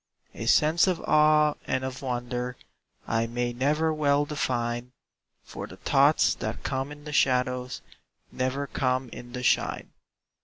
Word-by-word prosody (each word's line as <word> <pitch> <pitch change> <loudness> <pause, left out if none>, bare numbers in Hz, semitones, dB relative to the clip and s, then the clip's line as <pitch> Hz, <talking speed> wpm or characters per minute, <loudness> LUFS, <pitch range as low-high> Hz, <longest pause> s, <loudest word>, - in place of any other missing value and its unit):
A - - -6
sense 160 +4 +4
of 180 -3 +1
awe 150 0 +4
and 130 0 0
of 130 -1 -5
wonder 125 -1 -3 0.5
I 115 0 0
may 120 +1 -2
never 150 +6 +1
well 145 -1 +2
define, 125 -4 -2 0.5
For - - -8
the - - -12
thoughts - - +3
that - - -5
come 135 +2 -2
in 145 0 -11
the 150 0 -7
shadows 125 -1 +1 0.5
Never 130 +2 -2
come 130 -2 -1
in 120 +1 -10
the 125 -1 -5
shine. - - +1
130 Hz, 145 wpm, -27 LUFS, 125-150 Hz, 0.5 s, sense